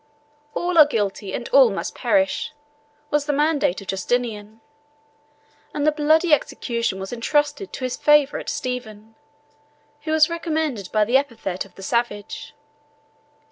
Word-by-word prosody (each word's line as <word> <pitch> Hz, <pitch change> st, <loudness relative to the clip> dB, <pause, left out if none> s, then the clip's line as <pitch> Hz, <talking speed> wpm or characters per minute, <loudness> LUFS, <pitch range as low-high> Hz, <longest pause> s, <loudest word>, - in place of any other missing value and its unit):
"All 350 Hz, -1 st, +1 dB
are 300 Hz, -, +9 dB
guilty, 205 Hz, -5 st, -2 dB
and -, -, -4 dB
all -, -, +6 dB
must -, -, -4 dB
perish," 290 Hz, -1 st, 0 dB, 0.6 s
was 295 Hz, 0 st, +1 dB
the 295 Hz, -, +1 dB
mandate 290 Hz, -, +1 dB
of 195 Hz, -, -12 dB
Justinian; 215 Hz, +1 st, -2 dB, 1.2 s
and 290 Hz, -, 0 dB
the 305 Hz, -, +5 dB
bloody 310 Hz, +2 st, +3 dB
execution 235 Hz, -8 st, -1 dB
was 190 Hz, +4 st, -6 dB
intrusted 295 Hz, -, 0 dB
to -, -, -7 dB
his 255 Hz, -1 st, -2 dB
favorite 295 Hz, -1 st, +3 dB
Stephen, 225 Hz, -4 st, -5 dB, 0.9 s
who 310 Hz, -, -4 dB
was 315 Hz, -1 st, +5 dB
recommended 315 Hz, -, -3 dB
by 215 Hz, -1 st, +3 dB
the 245 Hz, +5 st, +4 dB
epithet 225 Hz, -10 st, -3 dB
of 195 Hz, -, -20 dB
the 195 Hz, -, -11 dB
savage. 220 Hz, -2 st, -3 dB
255 Hz, 140 wpm, -22 LUFS, 215-300 Hz, 1.2 s, are